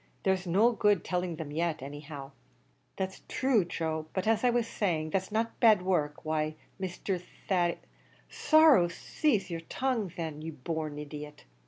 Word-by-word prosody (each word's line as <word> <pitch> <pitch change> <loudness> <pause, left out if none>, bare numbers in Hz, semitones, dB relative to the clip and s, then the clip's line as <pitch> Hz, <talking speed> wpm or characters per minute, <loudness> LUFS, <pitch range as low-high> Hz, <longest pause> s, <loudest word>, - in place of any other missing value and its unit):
there's 190 -1 +1
no 205 +8 +4
good 210 -5 +2
telling 180 -2 -1
them 155 -2 -6
yet, 165 +1 -1
any 145 +1 -7
how." 145 -2 -8 0.7
"That's 190 0 -3
thrue, 255 -8 +2
Joe; 160 -2 -3
but 185 - -1
as 225 +1 +2
I 250 - +5
was 240 -1 +2
saying, 165 -8 -1
that's 190 +3 -1
not 225 +2 -1
bad 220 -6 +6
work; 155 -6 0
why, 155 0 -1 0.3
Mr. 185 0 -2 0.3
Thady 175 -3 +2 0.4
" - - -31 0.2
"Sorrow 310 - +7
saze 200 - -1
yer 165 - -2
tongue, 230 +4 -1
thin, 160 -3 -5
ye 160 - -5
born 155 0 -4
idiot!" 150 0 -8
175 Hz, 165 wpm, -30 LUFS, 155-210 Hz, 0.7 s, Sorrow